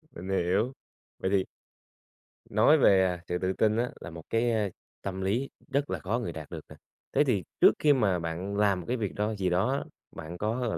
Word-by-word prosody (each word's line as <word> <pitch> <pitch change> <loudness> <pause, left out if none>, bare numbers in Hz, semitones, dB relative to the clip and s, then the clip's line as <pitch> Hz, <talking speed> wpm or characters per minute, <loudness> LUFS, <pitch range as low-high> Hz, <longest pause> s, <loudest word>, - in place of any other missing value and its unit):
Mình 95 +2 -7
hiểu. 95 +6 +1 0.5
Vậy 95 - -1
thì 95 -2 +3 1.1
Nói 110 +9 +5
về, 95 -9 +5
à, 90 -2 -2
sự 90 - -1
tự 95 0 0
tin 110 +2 +2
á, 120 +1 0
là 85 - -7
một 80 -1 -9
cái, 115 +1 +2
a, 110 -3 +1 0.3
tâm 95 -1 -4
lý 115 +8 0 0.2
rất 140 +1 0
là - - -2
khó 110 +6 -1
người 115 -8 -3
đạt 80 -2 -8
được - - -8
nè. - - -11 0.4
Thế - - +5
thì 110 - +1 0.2
trước - - +8
khi 150 -1 +5
mà 100 -9 +2
bạn 85 +4 -4
làm 100 -3 +3
một 85 - -8
cái 125 - 0
việc 105 -5 -3
đó 105 +2 0
gì 95 -2 0
đó 95 +8 +2
á, 140 - -1 0.3
bạn 80 +2 -7
có, 110 +5 -1
gọi 110 - -1
100 Hz, 230 wpm, -29 LUFS, 90-115 Hz, 1.1 s, trước